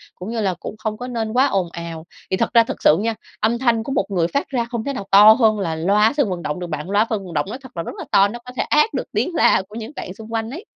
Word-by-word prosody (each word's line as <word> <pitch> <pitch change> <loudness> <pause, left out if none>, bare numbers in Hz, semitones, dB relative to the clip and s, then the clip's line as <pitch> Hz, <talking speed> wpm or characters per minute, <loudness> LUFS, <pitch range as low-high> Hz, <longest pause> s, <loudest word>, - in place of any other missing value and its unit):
cũng 180 +3 -8
như 230 -1 -2
là 195 -3 +1
cũng - - -7
không 215 0 -4
có 245 - -6
nên 225 -3 -3
quá 255 +2 +4
ồn 190 -8 -1
ào. 170 -1 -7 0.3
Thì 190 - +1
thật - - 0
ra 230 -1 +7
thực - - -6
sự 150 - +6
nha, 225 +2 -1 0.2
âm 225 +2 +1
thanh 235 -3 +2
của 270 - -5
một 260 -8 +1
người 175 -4 +1
phát 280 +10 -2
ra 245 -4 -1
không 235 -2 -4
thể 280 - -3
nào 200 -6 -6
to 205 +2 +9
hơn 220 -3 +2
là 165 -5 -2
loa 205 - +3
sân 280 -8 +2
vận 180 -2 -4
động 150 +2 -3
được 175 - -5
bạn. 155 +2 -5
Loa 205 +2 +3
phân 210 -4 -2
vận 175 - -9
động 145 -2 0
nói 235 - -5
thật 260 - -13
là 165 - -2
rất - - -6
là - - -6
to, 195 0 +5
nó 235 +4 -7
có 250 - -8
thể - - +1
át 300 +9 +2
được - - -2
tiếng 355 - -1
la - - +4
của 210 - -12
những 230 +2 -6
bạn 180 - -6
xung 220 +3 -11
quanh 225 0 -2
ấy. 335 - -8
215 Hz, 320 wpm, -20 LUFS, 185-235 Hz, 0.3 s, to